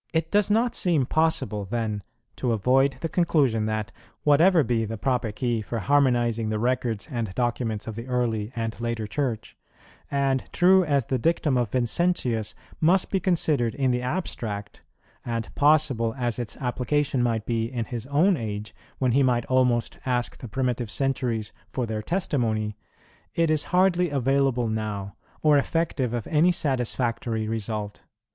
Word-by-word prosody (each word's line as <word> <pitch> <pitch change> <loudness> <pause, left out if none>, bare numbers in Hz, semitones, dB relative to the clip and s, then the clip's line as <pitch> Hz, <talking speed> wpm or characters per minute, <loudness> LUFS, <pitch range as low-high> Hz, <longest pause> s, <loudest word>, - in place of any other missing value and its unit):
It 160 0 0
does 205 -1 +3
not 230 +3 +2
seem 165 - +1
possible, 135 -9 0
then, 110 0 -2 0.4
to 125 -3 0
avoid 130 +6 +3
the - - -1
conclusion 140 -11 +2
that, 110 -1 -2 0.3
whatever 160 +3 +5
be 115 -2 0
the 110 +1 -4
proper 125 -1 0
key 120 0 -1
for 115 +2 -4
harmonizing 120 -3 +2
the 110 - -1
records 120 -2 -1
and 115 -6 -2
documents 120 -3 -1
of 115 - -5
the 115 +3 -7
early 120 -4 -1
and 115 -1 -2
later 115 -2 -2
Church, 115 0 -3 0.5
and 135 -2 +1
true 185 +1 +5
as 140 -6 +1
the 130 +1 -1
dictum 155 0 +1
of 120 -3 +1
Vincentius 120 - 0 0.2
must 180 +4 +3
be 195 - +2
considered 155 - +1
in 135 -2 +1
the 125 0 0
abstract, 110 - -4 0.4
and 115 -1 -4
possible 140 -6 +2
as 120 -2 -1
its 120 -2 -5
application 135 +1 0
might 115 -3 0
be 115 0 -1
in 120 -3 -2
his 120 +1 -6
own 165 +8 +3
age, 105 -3 -5 0.2
when 130 -2 +1
he 135 +4 +3
might 125 -3 +2
almost 125 -2 +1
ask 125 -2 -1
the 125 - -7
primitive 125 0 -2
centuries 125 -5 -1 0.2
for 125 - -1
their 110 -1 -3
testimony, 115 - -1 0.6
it 165 -1 +2
is 155 -1 +1
hardly 180 -1 +3
available 135 -3 +1
now, 105 -3 -3 0.3
or 150 -2 +5
effective 145 -5 -1
of 120 -3 -3
any 160 +4 +3
satisfactory 120 -6 -1
result. 110 -2 -4
125 Hz, 155 wpm, -25 LUFS, 115-145 Hz, 0.6 s, whatever